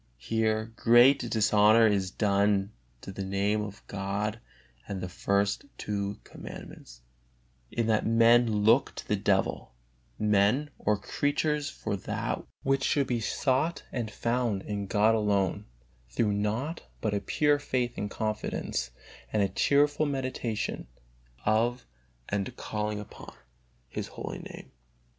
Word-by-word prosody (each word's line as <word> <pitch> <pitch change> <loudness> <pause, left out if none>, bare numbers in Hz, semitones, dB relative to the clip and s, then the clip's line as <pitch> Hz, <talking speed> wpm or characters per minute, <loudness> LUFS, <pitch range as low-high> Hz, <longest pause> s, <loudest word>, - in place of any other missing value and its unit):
Here 110 - -1
great 120 +1 +5
dishonor 110 +1 +5
is 100 -3 +2
done 100 0 +1 0.3
the 95 +1 -6
Name 100 +2 0
of 105 0 -8
God 100 +2 -3 0.5
and 100 -2 -4
the 90 - -4
first 100 +4 0
two 100 -1 -3
Commandments, - - -11 0.7
in 115 - -1
that 110 -1 +2
men 115 +1 +5 0.2
look 115 +6 +4
to - - -8
the 105 - +2
devil, 95 - 0 0.4
men 105 +8 +2
or 105 0 +1
creatures 145 +6 -1
for - - -4
that 95 - -3 0.2
which 135 0 +1
should 140 -1 +2
be 120 -2 -1
sought 135 +7 0
and 120 -4 -3
found 115 -3 -1
in 100 -1 -4
God 105 +2 +3
alone, 100 -4 +1 0.4
through 105 - +1
naught 110 +11 -2 0.2
but 110 -2 -1
a 100 - +1
pure 145 +4 +2
faith 125 -4 -1
and 105 - -3
confidence, 110 +1 -2 0.4
and 105 - +2
a 100 - +1
cheerful 145 +8 +2
meditation 130 - -3 0.6
of 115 +4 +1 0.4
and 100 -1 -3
calling 105 -1 -3
upon 105 - -11 0.5
His - - -5
holy - - -6
Name. - - -10
110 Hz, 130 wpm, -29 LUFS, 100-120 Hz, 0.7 s, great